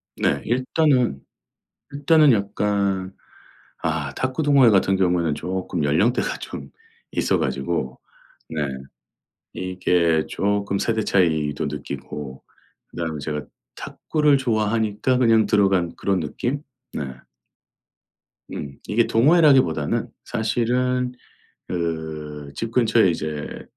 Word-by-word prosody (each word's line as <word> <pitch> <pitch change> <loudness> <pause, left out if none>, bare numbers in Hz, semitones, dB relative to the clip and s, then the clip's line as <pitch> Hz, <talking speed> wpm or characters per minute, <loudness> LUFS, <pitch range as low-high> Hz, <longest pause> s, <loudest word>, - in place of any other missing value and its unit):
네. 70 - 0
일단은 130 - +1 0.7
일단은 145 0 +4
약간 100 -2 -1 0.7
아 80 -4 -2
탁구 130 +4 -1
동호회 140 -5 +6
같은 95 -1 +3
경우에는 90 -5 +1
조금 90 -1 -3
연령대가 85 +12 +1
좀 - - -8 0.4
있어 - - +1
가지고 - - -2 0.5
네 75 - -3 0.9
이게 90 -3 +1
조금 100 0 -1
세대 110 0 0
차이도 80 -7 +1
느끼고 70 -1 -7 0.4
그다음에 80 -3 -4
제가 75 0 -3 0.3
탁구를 150 -2 +1
좋아하니까 110 0 0
그냥 115 -3 +4
들어간 95 -4 +2
그런 95 -2 0
느낌? 125 - -3 0.3
네. - - -3 1.5
음. 70 -1 -7
이게 115 +2 +2
동호회라기보다는 130 - +3 0.2
사실은 125 +3 0 0.5
그 80 -3 -3 0.3
집 115 0 -4
근처에 115 -4 +4
이제 75 -2 -5
100 Hz, 230 characters per minute, -22 LUFS, 80-120 Hz, 1.5 s, 동호회